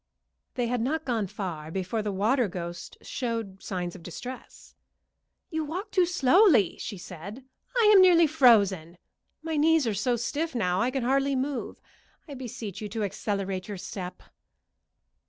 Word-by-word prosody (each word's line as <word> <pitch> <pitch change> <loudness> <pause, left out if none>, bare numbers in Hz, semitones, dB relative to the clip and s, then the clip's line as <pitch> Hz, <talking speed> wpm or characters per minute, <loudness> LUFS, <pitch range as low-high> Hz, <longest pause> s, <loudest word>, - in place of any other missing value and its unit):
They 245 -2 0
had 240 0 -1
not 310 +6 -1
gone 230 -6 -1
far 170 -6 -5
before 190 +5 -2
the 210 -1 -2
water 220 +5 +2
ghost 175 -2 -7
showed 230 -6 -4
signs 180 -2 -4
of 185 - -11
distress. 245 +10 -9 0.8
"You 320 -1 -1
walk 365 +8 -5
too 365 -2 +3
slowly," 335 - +4
she 205 - -5
said. 185 +8 -9 0.4
"I - - +5
am 385 - +9
nearly 350 -2 +7
frozen. 200 - +4 0.5
My 320 -1 -2
knees 320 -1 +4
are 225 - 0
so 225 +5 0
stiff 285 +6 -3
now 185 -5 +1
I 240 - +2
can 260 -1 -2
hardly 275 +2 +2
move. 265 +1 -3 0.5
I 290 - -8
beseech 235 -7 -7
you 210 - -5
to 220 +1 -3
accelerate 195 -2 -3
your 205 -2 -5
step." 180 0 -7
230 Hz, 155 wpm, -27 LUFS, 190-275 Hz, 0.8 s, am